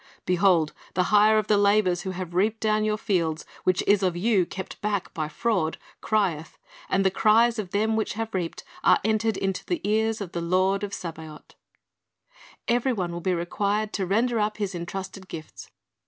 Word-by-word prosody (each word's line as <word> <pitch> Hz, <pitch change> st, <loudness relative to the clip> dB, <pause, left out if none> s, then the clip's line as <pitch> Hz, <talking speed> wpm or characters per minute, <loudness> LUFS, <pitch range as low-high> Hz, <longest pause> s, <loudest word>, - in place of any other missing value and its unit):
"Behold, 180 Hz, -4 st, +3 dB, 0.2 s
the 180 Hz, -, +3 dB
hire 215 Hz, +1 st, +6 dB
of 215 Hz, -, +1 dB
the 210 Hz, -1 st, +3 dB
laborers 200 Hz, -3 st, +3 dB
who 190 Hz, -, -5 dB
have 185 Hz, -2 st, -5 dB
reaped 210 Hz, +5 st, +1 dB
down 215 Hz, -1 st, +1 dB
your 215 Hz, 0 st, 0 dB
fields, 170 Hz, -6 st, -1 dB, 0.2 s
which 185 Hz, 0 st, +2 dB
is 205 Hz, 0 st, +4 dB
of 180 Hz, -2 st, 0 dB
you 195 Hz, -2 st, +2 dB
kept 190 Hz, -, -8 dB
back 205 Hz, -2 st, -2 dB
by 155 Hz, -3 st, -2 dB
fraud, 165 Hz, -1 st, -1 dB, 0.2 s
crieth: 185 Hz, -8 st, -1 dB, 0.3 s
and 195 Hz, 0 st, +1 dB
the 190 Hz, -, +4 dB
cries 225 Hz, +3 st, +3 dB
of 195 Hz, -4 st, -4 dB
them 215 Hz, +3 st, +1 dB
which 220 Hz, -, -1 dB
have 225 Hz, +1 st, -4 dB
reaped 175 Hz, -3 st, -3 dB, 0.2 s
are -, -, +6 dB
entered 220 Hz, +1 st, +1 dB
into 195 Hz, -1 st, -2 dB
the 350 Hz, -, -2 dB
ears 220 Hz, +1 st, +1 dB
of 195 Hz, -4 st, -6 dB
the 170 Hz, -, -3 dB
Lord 185 Hz, +3 st, +1 dB
of 205 Hz, -, -3 dB
Sabaoth."' 160 Hz, -4 st, -8 dB, 1.1 s
Every 245 Hz, +2 st, +2 dB
one 180 Hz, -6 st, -2 dB
will 170 Hz, 0 st, -5 dB
be 185 Hz, +1 st, 0 dB
required 205 Hz, +5 st, -1 dB
to 190 Hz, -2 st, -2 dB
render 230 Hz, +4 st, +1 dB
up 210 Hz, 0 st, 0 dB
his 200 Hz, -3 st, -2 dB
entrusted 190 Hz, +2 st, -6 dB
gifts. 155 Hz, -3 st, -9 dB
195 Hz, 185 wpm, -25 LUFS, 180-215 Hz, 1.1 s, hire